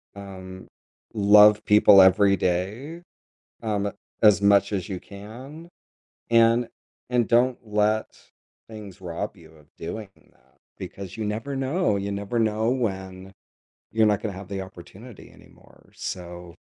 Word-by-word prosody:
um, 95 -2 -10 0.5
love 105 0 +6
people 105 -1 +7
every 100 +1 +4
day, 105 - -3 0.6
um, 100 -2 -1 0.3
as 105 -2 +6
much 100 0 +3
as 95 -4 -3
you 95 -2 -5
can, 125 +11 -11 0.6
and 115 +1 +4 0.4
and 120 -3 +1
don't 125 +2 +2
let 105 +1 0 0.5
things 105 -4 -11
rob 90 +4 -5
you 80 -2 -17
of 75 -2 -21
doing 100 +5 -7 0.2
that. 65 +2 -32 0.2
Because 95 0 -9
you 110 - -3
never 115 +7 -4
know 135 - 0
you 100 +1 -4
never 100 +4 -3
know 110 +1 +1
when 95 -6 -4 0.6
you're 110 0 +3
not 105 -2 +1
gonna 105 -3 -4
have 95 0 -10
the 100 -1 -5
opportunity 95 +5 -13
anymore, - - -21
so 90 -1 -7
100 Hz, 135 wpm, -24 LUFS, 95-110 Hz, 0.6 s, people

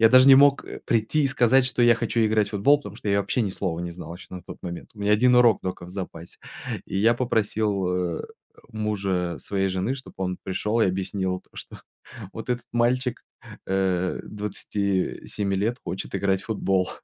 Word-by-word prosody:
Я 115 - +7
даже 130 +1 +7
не 135 - +10
мог, 140 +1 +5
э, - - -8
прийти 115 +6 +1
и - - +3
сказать, 130 0 +4
что 125 -1 0
я 120 0 +6
хочу 115 0 -1
играть 110 -1 +2
в - - -12
футбол, 120 +8 +4
потому 105 -7 -10
что 105 - -5
я 100 0 +3
вообще 125 - -1
ни 100 - 0
слова 90 -3 -3
не 85 - -4
знал 85 0 -8
еще 90 - -12
на 90 -2 -8
тот - - -10
момент. 85 -1 -7
У 105 - -17
меня 105 +1 +1
1 125 +4 +5
урок 120 -3 +5
только 90 -1 -5
в - - -11
запасе. 90 -3 -7 0.5
И - - -5
я 115 +3 +4
попросил, 110 -5 0 0.3
э, - - -5 0.5
мужа 100 -5 -2
своей 95 -1 -1
жены, 95 +7 -1
чтобы 130 - -11
он 90 -1 -2
пришёл 105 +4 -1
и - - +5
объяснил 95 0 -2
то, - - -35
что - - -9 0.6
вот 115 +2 -6
этот 120 -1 -2
мальчик, 125 +1 +1 0.4
э, 95 -1 0
27 100 -1 -2
лет 115 +5 0
хочет 95 - -5
играть 95 0 +1
в - - -15
футбол. 95 -4 0
105 Hz, 200 wpm, -25 LUFS, 95-120 Hz, 0.6 s, не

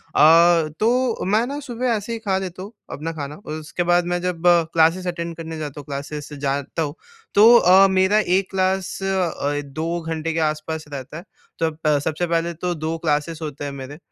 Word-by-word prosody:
अ, 165 0 +6
तो 240 +1 +1
मैं 215 +5 +2
ना 285 +1 -4
सुबह 250 -2 -4
ऐसे 215 +3 -4
ही 225 - -4
खा 195 -4 0
लेता 185 -1 -5
हूँ 205 - -9 0.2
अपना 160 +3 -4
खाना 145 -1 -6
और 155 - -8
उसके 165 +3 -3
बाद 175 0 +3
मैं 175 - -1
जब 180 -2 -3 0.3
क्लासेज़ 165 +3 +3
अटेंड 170 -1 -4
करने 165 -1 -6
जाता 150 -1 -6
हूँ, 140 - -10
क्लासेज़ 145 +1 -6
जाता 140 +3 -2
हूँ 150 0 -2 0.4
तो 225 +4 +8
अ, 190 +1 +6
मेरा 190 +2 +3
1 190 -1 +1
क्लास 190 -1 0
अ, 170 -6 -1
2 160 +5 -3
घंटे 160 0 -3
के 165 - -1
आसपास 155 +1 -6
रहता 140 +3 -7
है। 170 - -9 0.4
तब 160 -2 -1
प 150 -2 +3 0.2
सबसे 175 - +2
पहले 170 0 0
तो 175 +2 -3
2 160 +1 -3
क्लासेज़ 155 0 -1
होते 145 -1 -6
हैं 140 - -4
मेरे 140 +2 -8
165 Hz, 200 wpm, -22 LUFS, 155-190 Hz, 0.4 s, तो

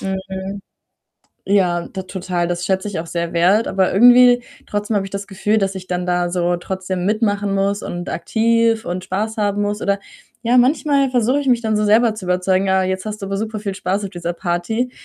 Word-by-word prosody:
Hm. 190 +1 -5 0.8
Ja, 180 -4 +1
t 190 -1 -6
total, 180 -2 -3
das 175 0 -2
schätze 190 +2 -1
ich 190 - -4
auch 165 - -4
sehr 170 0 -3
wert, 190 +6 +3
aber 190 -1 +1
irgendwie 245 +3 +6 0.2
trotzdem 205 +1 -2
habe 195 - 0
ich - - -11
das 200 0 -5
Gefühl, 210 +2 0
dass 195 -1 -1
ich 185 -1 -7
dann 180 0 -2
da 175 -1 0
so 175 0 0
trotzdem 185 0 -4
mitmachen 205 -1 0
muss 200 +1 0
und 175 +1 -5
aktiv 230 0 +1
und 180 +1 -3
Spaß 215 +5 -3
haben 205 -1 0
muss 205 +1 -2
oder 200 0 +1 0.4
ja, 240 +1 +2
manchmal 275 +1 +3
versuche 255 +3 +2
ich 280 - -3
mich 245 -2 +3
dann 220 -2 0
so 210 - +1
selber 220 +1 +4
zu 205 - -8
überzeugen: 185 +1 +1
„Ah, 190 0 +3
jetzt 185 0 -2
hast 215 -1 -5
du 195 - -5
aber 195 0 -2
superviel 215 -2 -4
Spaß 195 +2 -2
auf 195 - -5
dieser 175 -1 -4
Party“, 175 +8 -2
195 Hz, 205 wpm, -19 LUFS, 185-220 Hz, 0.8 s, irgendwie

